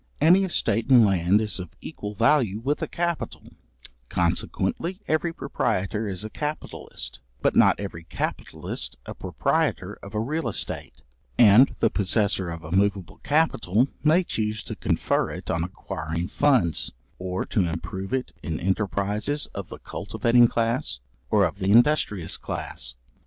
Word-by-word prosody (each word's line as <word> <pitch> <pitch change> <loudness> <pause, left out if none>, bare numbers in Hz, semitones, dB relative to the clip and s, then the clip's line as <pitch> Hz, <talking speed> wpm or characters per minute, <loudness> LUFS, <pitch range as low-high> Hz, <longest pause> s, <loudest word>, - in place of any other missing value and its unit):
Any 175 +6 +6
estate 115 - 0
in 125 -4 +8
land 95 0 +3
is 105 -3 0
of 90 -3 -8
equal 105 0 -7
value 115 -2 +3
with 135 +7 -1
a - - -1
capital; 170 -1 -3 0.6
consequently 180 +3 -1
every 155 +2 +1
proprietor 105 - -1
is 95 0 -3
a - - -5
capitalist, 150 +1 -5 0.2
but - - +2
not - - +5
every 90 -5 -6
capitalist - - -4
a - - -6
proprietor - - -1
of 100 +2 -10
a - - +1
real 130 +3 -1
estate; - - -5 0.3
and 120 +3 +7
the 115 - +4
possessor 100 -2 +1
of 85 0 -6
a 80 - -8
moveable 100 -2 0
capital 130 - +2
may 160 +4 +5
chuse 110 - -2
to - - -6
confer - - 0
it - - -5
on 80 0 0
acquiring 85 -1 -4
funds, 125 - +2 0.3
or 90 0 -3
to 90 -5 +1
improve 90 +4 -5
it 130 -1 -1
in 80 -2 -3
enterprizes 100 - -1
of 100 -3 -6
the - - -8
cultivating 120 0 +2
class, 115 - -1 0.3
or 100 -2 +4
of 90 +4 -3
the 95 0 +1
industrious 115 - +3
class. - - -4
105 Hz, 145 wpm, -25 LUFS, 95-130 Hz, 0.6 s, in